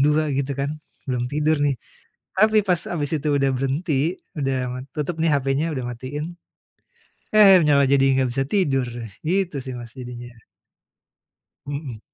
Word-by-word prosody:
00 150 +2 +3
gitu 140 +1 -1
kan, 145 +2 -3 0.2
belum 125 -2 -2
tidur 150 +1 +1
nih. 145 -2 +2 0.6
Tapi 215 -1 +5
pas 180 -4 +2
habis 145 -5 -2
itu 150 -1 -1
udah 135 -1 +2
berhenti, 140 +5 0 0.2
udah, 135 -1 0 0.2
eee, - - -7
tutup 155 +3 -2
nih 165 0 +3
HP-nya 135 +3 0
udah 130 - -3
matiin, 145 +7 -5 1.0
eh 195 -4 +8
malah 140 -2 +4
jadi 135 -1 +4
nggak 130 -1 +1
bisa 135 - +2
tidur, 140 -10 +2 0.4
gitu 180 0 0
sih 130 - -5
Mas 115 -1 -10
jadinya. 120 -2 -9 1.3
Mhm. 140 -6 -5
140 Hz, 150 wpm, -23 LUFS, 135-155 Hz, 1.3 s, eh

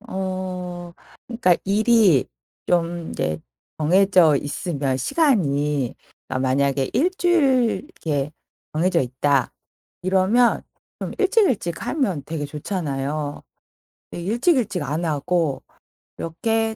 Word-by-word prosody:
어. 185 -2 -5 0.3
그러니까 225 -8 +2
일이 210 - +4 0.4
좀 170 -1 0
이제 80 0 -2 0.4
정해져 180 -1 +4
있으면, 145 -2 -2
시간이. 150 - +1 0.3
그러니까 130 0 -1
만약에 135 0 +1
1 350 +6 +2
주일 275 -10 +3
이렇게 150 - -3 0.4
정해져 170 +3 +2
있다. 130 +1 +1 0.5
이러면 195 +6 +3 0.4
좀 - - -4
일찍일찍 375 - +1
하면 200 - -1
되게 160 -2 -4
좋잖아요. 145 -2 -3 0.7
예. - - -5
일찍일찍 235 - +1
안 155 +4 -2
하고 155 -1 0 0.6
이렇게 225 +7 -1
175 Hz, 225 characters per minute, -22 LUFS, 145-220 Hz, 0.7 s, 일이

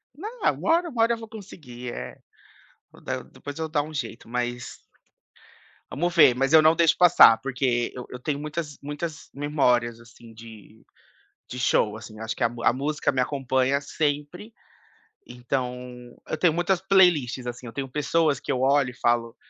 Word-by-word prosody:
Não 430 - -8
uma - - 0
hora 340 +1 +2
uma 240 -6 -2
hora 230 +1 +4
eu - - -3
vou 225 0 -10
conseguir, 140 - -9
eh. 65 +1 -8 0.7
Vou - - -18
dar - - -4
é - - -15
depois 145 0 -10
eu - - -1
vou 160 - -4
dar 145 -2 +1
um 155 +1 -10
jeito, 120 -5 -6
mas 120 0 -4 1.1
vamos 175 +4 -2
ver, 145 -7 +7
mas 135 +2 0
eu 160 -1 +8
não 160 +1 +5
deixo 165 -1 +4
passar, 175 -10 +7
porque 125 -3 -1
eu 125 - -8
eu 125 - -7
tenho 140 +2 -2
muitas 150 0 -5
muitas 150 +2 -6
memórias 125 -5 +1
assim 115 0 -16
de 110 -1 -14 0.6
de 125 - -7
show. 110 -3 +1
Assim, 110 0 -11
acho 110 0 -3
que - - -2
a - - +5
mu 120 0 -9
a - - +5
música 145 +3 -1
me 130 - -2
acompanha 135 0 0
sempre. 150 +9 -3 0.7
Então 125 0 -5
eu - - -3
tenho 165 -1 +3
muitas 175 +1 +1
playlists 170 -11 +3
assim. 120 +1 -6
Eu 115 - -8
tenho 135 +2 -4
pessoas 150 0 +1
que - - -6
eu 130 -2 0
olho 140 -1 +3
e - - -13
falo 120 -1 0
135 Hz, 190 wpm, -25 LUFS, 120-160 Hz, 1.1 s, eu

